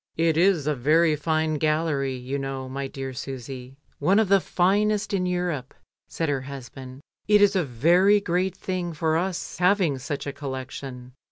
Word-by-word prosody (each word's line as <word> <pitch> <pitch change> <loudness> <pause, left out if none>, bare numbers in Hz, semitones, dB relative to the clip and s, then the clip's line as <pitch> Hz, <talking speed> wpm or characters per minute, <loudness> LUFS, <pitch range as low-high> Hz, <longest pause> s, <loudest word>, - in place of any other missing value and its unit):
"It 165 -1 +2
is 170 -3 +3
a 150 - +1
very 155 +5 +3
fine 155 0 0
gallery, 155 -3 0
you 130 +3 -4
know, 135 -1 -4
my 135 +1 -4
dear 135 -1 -6
Susy, 130 0 -7 0.2
one 195 +2 +3
of 220 -3 +3
the 195 0 +6
finest 205 +4 +1
in 180 -2 +1
Europe," 175 -7 -2 0.3
said 165 - -2
her 140 -2 0
hus 135 -1 -8
band. 130 0 -11 0.3
"It 210 0 +6
is 205 0 +4
a 185 - +2
very 170 - +4
great 185 0 -1
thing 180 -2 -3
for 160 0 0
us 180 +1 -3
having 180 -6 +2
such 140 +2 -4
a 140 - -4
collection. 130 -2 -7
155 Hz, 175 wpm, -25 LUFS, 135-180 Hz, 0.3 s, the